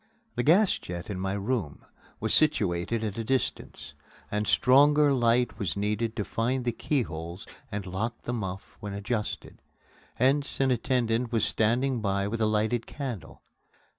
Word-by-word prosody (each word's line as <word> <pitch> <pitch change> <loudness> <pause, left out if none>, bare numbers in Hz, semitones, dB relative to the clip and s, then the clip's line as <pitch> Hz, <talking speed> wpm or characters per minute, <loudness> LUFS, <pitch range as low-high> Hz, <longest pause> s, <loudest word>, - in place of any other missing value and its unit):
The - - 0
gas 180 - +4
jet 85 +3 -6
in 95 - -4
my 95 +1 -1
room 100 - -2 0.3
was 110 0 0
situated 110 - +2
at 105 0 -3
a - - -1
distance, 130 +2 -2 0.4
and 105 0 -1
stronger 145 +2 +5
light 120 -1 +2
was 100 -4 -2
needed 105 +2 -1
to 105 - -2
find 125 +3 -1
the 120 - +2
keyholes 90 - -3 0.3
and 100 -2 -4
lock 105 +6 -4
the 120 - -3
muff 95 -5 -5
when 105 -1 -6
adjusted. 105 +1 -4 0.5
Hence, 140 +3 +1
an 135 -1 +3
attendant 120 -1 0
was 115 -2 +2
standing 120 +3 +1
by 100 -1 0
with 115 +2 -3
a 110 - +3
lighted 110 +2 0
candle. 130 - -6
115 Hz, 155 wpm, -28 LUFS, 100-125 Hz, 0.5 s, stronger